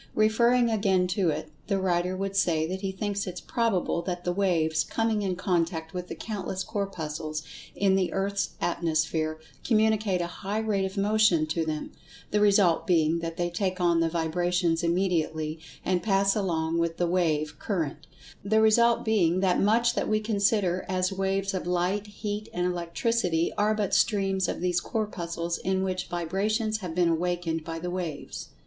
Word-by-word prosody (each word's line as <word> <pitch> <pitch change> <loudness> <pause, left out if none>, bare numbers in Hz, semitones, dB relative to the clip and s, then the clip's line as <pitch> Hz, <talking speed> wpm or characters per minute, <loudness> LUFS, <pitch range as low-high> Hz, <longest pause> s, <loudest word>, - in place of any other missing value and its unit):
Referring 235 +2 +3
again 195 -4 +2
to 185 -2 +1
it, 155 0 -3 0.2
the 200 - +1
writer 180 -1 0
would 195 0 -3
say 170 -5 +2
that 185 +3 -4
he 195 -2 -2
thinks 200 +1 -3
it 180 -1 -5
probable 220 -7 0
that 175 0 -4
the 175 - 0
"waves" 165 -5 +1
coming 225 -2 0
in 190 -2 -1
contact 170 -3 -1
with 180 -1 -4
the - - -6
countless 195 -3 -4
Corpuscles 155 -7 -4 0.3
in 195 -1 +2
the 190 -2 +1
Earth's 195 +1 -1
atmosphere, 155 -2 0 0.2
communicate 215 -4 +2
a 175 - 0 0.2
high 200 +2 -2
rate 210 -3 0
of 190 +1 -6
motion 205 -5 +3
to 160 +1 -1
them, 155 -1 -3 0.4
the 210 - +2
result 200 -5 +4
being 165 -2 +3
that 165 0 -5
they 175 0 -1
take 185 +1 -1
on 170 -2 +3
the 165 0 +2
vibrations 170 +1 0
immediately, 165 -3 0 0.3
and 180 -1 +1
pass 195 0 +2
along 165 -5 0
with 170 0 -1
the 175 - +1
"wave" 160 -4 0
current—the 180 +4 -3
result 235 +2 +4
being 185 -6 +2
that 185 -2 +2
much 235 +4 +3
that - - -1
we 215 0 +2
consider 200 -4 +1
as 185 0 0
waves 195 0 -1
of 185 -2 -3
Light, 180 +4 0
Heat 210 +1 -5
and 180 0 -1
Electricity 175 0 0
are 210 +1 +2
but 205 -2 -1
streams 195 -2 +2
of - - -3
these 180 -1 +1
Corpuscles 170 -6 -3
in 190 0 0
which 185 -1 -2
vibrations 210 +6 -1
have 180 -5 -6
been 175 -1 +3
awakened 165 -1 -1
by 165 0 -5
the 175 +2 -4
"waves." 170 -5 -5
185 Hz, 170 wpm, -27 LUFS, 170-200 Hz, 0.4 s, result